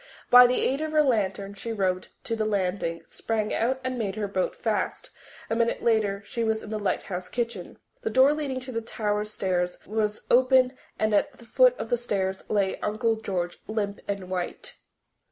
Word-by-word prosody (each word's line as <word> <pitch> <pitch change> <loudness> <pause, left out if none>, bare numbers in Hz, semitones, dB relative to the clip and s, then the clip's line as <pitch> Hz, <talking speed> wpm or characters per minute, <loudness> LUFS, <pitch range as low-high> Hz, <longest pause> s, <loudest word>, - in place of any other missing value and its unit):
By 245 0 +10
the 250 - +1
aid 275 +3 +2
of 310 0 -3
her 305 -1 +5
lantern 200 -6 0
she 215 +3 -6
rowed 185 -4 0 0.2
to 230 - -2
the 220 - -1
landing, 185 -5 -1
sprang 215 -2 -2
out 260 +4 +1
and 255 -1 -2
made 200 -3 -2
her 210 -2 -2
boat 190 -2 -1
fast. - - -2 0.4
A 225 - -1
minute 235 0 0
later 210 -4 +1
she 235 +2 -3
was 220 -1 0
in 215 - -8
the 215 - -2
lighthouse 185 -2 -2
kitchen. 230 -7 -4 0.2
The - - -1
door 260 +5 +5
leading 285 -4 -2
to 255 0 -6
the 230 -2 -2
tower 210 -2 -2
stairs 180 -4 -1
was 210 0 -1
open 255 +1 +5 0.2
and 215 0 +1
at 285 +7 +2
the 235 - -16
foot - - +4
of 225 - -6
the 240 - +3
stairs 190 -5 -2
lay 200 -2 +1
Uncle 220 +2 0
George, 180 -5 -3
limp 205 -2 -2
and 200 -2 -3
white. 185 - -3
215 Hz, 190 wpm, -26 LUFS, 195-245 Hz, 0.4 s, By